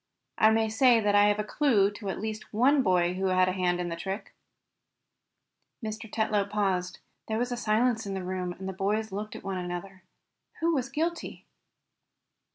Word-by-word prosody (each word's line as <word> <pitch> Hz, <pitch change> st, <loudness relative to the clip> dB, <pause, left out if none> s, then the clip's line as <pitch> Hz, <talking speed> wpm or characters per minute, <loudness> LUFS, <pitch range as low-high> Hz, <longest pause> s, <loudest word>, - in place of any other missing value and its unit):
I 220 Hz, -, +7 dB
may 220 Hz, 0 st, +2 dB
say 235 Hz, +2 st, +4 dB
that 205 Hz, -2 st, +1 dB
I 205 Hz, 0 st, +6 dB
have 205 Hz, 0 st, +3 dB
a 210 Hz, -, -1 dB
clue 210 Hz, -4 st, +2 dB
to 205 Hz, -1 st, -6 dB
at -, -, -3 dB
least 215 Hz, +1 st, -5 dB
one 270 Hz, +6 st, +4 dB
boy 180 Hz, -5 st, +2 dB
who 190 Hz, +1 st, -1 dB
had 185 Hz, 0 st, +3 dB
a -, -, +1 dB
hand 180 Hz, -1 st, 0 dB
in 175 Hz, -1 st, -2 dB
the 170 Hz, -, -3 dB
trick." 190 Hz, +4 st, -5 dB, 1.5 s
Mr. 220 Hz, 0 st, -6 dB
Tetlow 210 Hz, -2 st, 0 dB
paused. 190 Hz, -3 st, -1 dB, 0.3 s
There 220 Hz, -, -1 dB
was 245 Hz, +2 st, -1 dB
silence 225 Hz, 0 st, +1 dB
in 195 Hz, -, -3 dB
the 190 Hz, -, -4 dB
room, 180 Hz, -1 st, -3 dB
and 190 Hz, +2 st, -8 dB
the 190 Hz, -, -3 dB
boys 210 Hz, +3 st, -1 dB
looked 210 Hz, +2 st, -5 dB
one 190 Hz, -1 st, -3 dB
at 180 Hz, -, -4 dB
the 175 Hz, -, -3 dB
other. 190 Hz, +1 st, -9 dB, 0.6 s
Who 335 Hz, +1 st, +2 dB
was 265 Hz, -3 st, -1 dB
guilty? 330 Hz, +4 st, -3 dB
205 Hz, 190 wpm, -28 LUFS, 185-220 Hz, 1.5 s, I